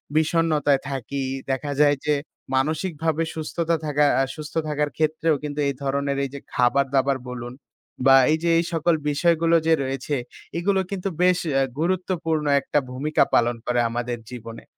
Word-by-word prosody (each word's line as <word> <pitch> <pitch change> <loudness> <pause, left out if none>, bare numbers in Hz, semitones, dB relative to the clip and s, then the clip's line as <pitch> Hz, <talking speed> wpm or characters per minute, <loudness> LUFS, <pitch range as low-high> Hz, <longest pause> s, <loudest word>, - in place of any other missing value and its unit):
বিষণ্ণতায় 155 -3 +2
থাকি। 135 +1 -3 0.3
দেখা 140 +2 -2
যায় 145 -1 +5
যে 150 - +3 0.4
মানসিকভাবে 160 +2 0
সুস্থতা 165 +1 -1
থাকা 150 0 +2 0.2
আ - - +3
সুস্থ 150 -1 -8
থাকার 150 0 0
ক্ষেত্রেও 160 0 +1
কিন্তু 150 0 -4
এই 140 - 0
ধরনের 140 0 -1
এই 135 - -2
যে 140 - -5
খাবার 125 +3 +3
দাবার 135 0 +2
বলুন 120 0 -6 0.5
বা 135 - +8 0.2
এই 160 - +3
যে 170 - +2
এই 170 - +1
সকল 165 +1 +2
বিষয়গুলো 165 +2 +2
যে 165 - +5
রয়েছে। 135 +2 -2 0.4
এগুলো 190 +3 +1
কিন্তু 195 0 -2
বেশ 180 -1 +4 0.4
গুরুত্বপূর্ণ 170 -3 -1 0.2
একটা 145 - +1
ভূমিকা 145 +4 +1
পালন 120 0 +3
করে 125 0 +1
আমাদের 120 +1 -3
জীবনে। 115 -2 -8
150 Hz, 155 wpm, -23 LUFS, 135-165 Hz, 0.5 s, বা